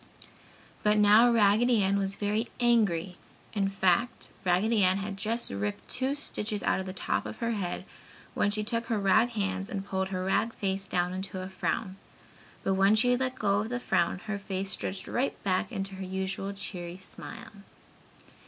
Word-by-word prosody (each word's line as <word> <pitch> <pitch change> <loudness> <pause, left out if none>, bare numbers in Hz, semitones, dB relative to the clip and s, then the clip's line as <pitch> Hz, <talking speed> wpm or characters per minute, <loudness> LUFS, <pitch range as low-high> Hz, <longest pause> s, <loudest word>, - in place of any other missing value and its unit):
But 210 0 +3
now 210 +3 +7
Raggedy 225 +1 +4
Ann 200 +1 +2
was 195 0 -1
very 210 +3 -1
angry 200 -8 +2 0.4
in 200 -3 +1
fact, 195 +4 +1
Raggedy 200 +4 +3
Ann 185 +1 +4
had 200 0 -4
just 225 +4 -2
ripped 100 +1 -3
two 260 +2 -1
stitches 215 -8 -3
out - - +2
of 190 - -4
the - - -3
top 190 - -2
of - - -7
her 230 0 -1
head 195 -6 -3 0.5
when 205 - +2
she 210 +1 0
took 230 +1 -2
her 225 - 0
rag 200 +4 +4
hands 195 -1 -2
and 200 -5 -4
pulled 190 -1 -1
her 185 -1 -2
rag 225 +4 +1
face 195 0 -1
down 180 -1 0
into 190 0 -5
a 185 +1 -5
frown 190 0 -2 0.7
(but 195 - +1
when 195 +2 +4
she 245 +3 +4
let 255 0 -1
go 200 -1 +2
of 215 +2 -2
the 245 0 -2
frown 175 -7 +1
her 215 -2 -3
face 195 -1 -3
stretched 190 +1 -3
right 260 +3 -1
back 185 +3 0
into 195 -3 -4
her 190 0 -6
usual 190 +1 -3
cheery 180 -3 -6
smile). 225 +4 -10
200 Hz, 180 wpm, -29 LUFS, 190-220 Hz, 0.7 s, now